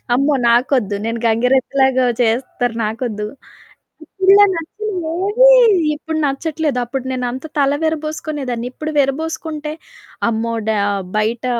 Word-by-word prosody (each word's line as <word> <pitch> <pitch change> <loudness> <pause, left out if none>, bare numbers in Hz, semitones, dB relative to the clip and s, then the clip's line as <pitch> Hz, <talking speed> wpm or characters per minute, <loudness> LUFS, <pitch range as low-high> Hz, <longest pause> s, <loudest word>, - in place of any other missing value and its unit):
"అమ్మో! 280 +4 +2 0.2
నాకొద్దు. 235 -4 +2
నేను 230 0 -3
గంగిరెద్దులాగా 260 +2 +2
చేస్తారు 245 0 -1
నాకొద్దు." 215 -1 -3 0.8
ఇప్పుడిలా 390 +4 +5
నచ్చెనవేవి 385 +5 +1 0.5
ఇప్పుడు 320 +1 -5
నచ్చట్లేదు. 295 -1 -1
అప్పుడు 260 +1 -5
నేనంత 255 +1 -3
తల 280 0 +3
విరబోసుకునేదాన్ని. 300 -6 -3
ఇప్పుడు 310 +2 -5
విరబోసుకుంటే 305 +2 -2 0.6
అమ్మో! 230 +1 -2 0.2
డా 220 - +1 0.4
బయట 225 +3 -1
270 Hz, 100 wpm, -18 LUFS, 240-315 Hz, 0.8 s, ఇప్పుడిలా